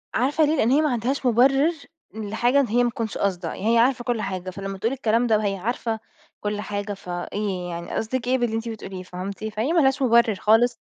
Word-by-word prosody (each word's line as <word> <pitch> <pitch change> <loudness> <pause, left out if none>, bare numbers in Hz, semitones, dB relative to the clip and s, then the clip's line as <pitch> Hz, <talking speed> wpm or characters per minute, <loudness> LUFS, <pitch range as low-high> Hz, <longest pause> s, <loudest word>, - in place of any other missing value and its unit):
عارفة 285 +6 +2
ليه؟ 310 +2 +1
لإن 235 - +2
هي 295 +3 +4
ما 305 -3 +1
عندهاش 250 +4 -1
مُبرر 270 +6 +4 0.4
لحاجة 220 +5 +1
إن 270 - +2
هي 240 +3 +2
ما 240 - +2
تكونش 230 -3 -4
قاصدة، 180 -4 -1
هي 230 +3 +1
عارفة 240 +1 +3
كُلّ 235 -3 -1
حاجة، 185 -2 -4
فلما 195 +1 -6
تقول 230 +7 -1
الكلام 240 -2 +1
ده 220 -2 +4
وهي 200 -2 -1
عارفة 225 +2 -2 0.4
كُلّ 210 0 -2
حاجة، 205 0 -4
فإيه 180 0 -4
يعني 170 0 -6
قصدِك 245 +2 -2
إيه 260 +1 +3
باللي 240 -2 -1
أنتِ 230 +1 -3
بتقوليه 190 -4 -7
فهمتِ؟ 190 +4 -6
فهي 220 +9 -1
ما 340 - +4
لهاش 270 +1 +2
مُبرر 235 -4 +4
خالص. 225 +5 +3
225 Hz, 210 wpm, -24 LUFS, 200-245 Hz, 0.4 s, هي